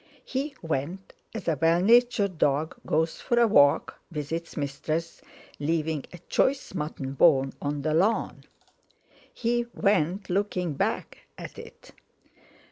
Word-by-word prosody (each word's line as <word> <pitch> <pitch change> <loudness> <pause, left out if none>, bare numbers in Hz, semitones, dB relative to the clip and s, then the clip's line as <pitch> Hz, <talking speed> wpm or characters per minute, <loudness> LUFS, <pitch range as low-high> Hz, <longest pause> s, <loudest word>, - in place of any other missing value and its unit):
He 275 +2 -3
went 165 +5 -3 0.2
as 220 - -6
a 165 - +2
well 165 +1 +4
natured 215 -3 +3
dog 150 +5 +1
goes 160 +1 0
for 240 -2 +1
a 235 - +6
walk 145 -10 +4
with 150 -2 -5
its 165 +1 -4
mistress, 155 +3 -3 0.4
leaving 155 -1 -1
a 175 - -9
choice 270 -5 +1
mutton 150 -5 -4
bone 135 -2 +4
on 145 -1 -2
the 155 0 0
lawn. 195 +8 +1 0.9
He 240 0 -1
went 195 -1 +1
looking 180 -3 -1
back - - -2 0.2
at - - -9
it. - - -13
165 Hz, 130 wpm, -27 LUFS, 150-200 Hz, 0.9 s, a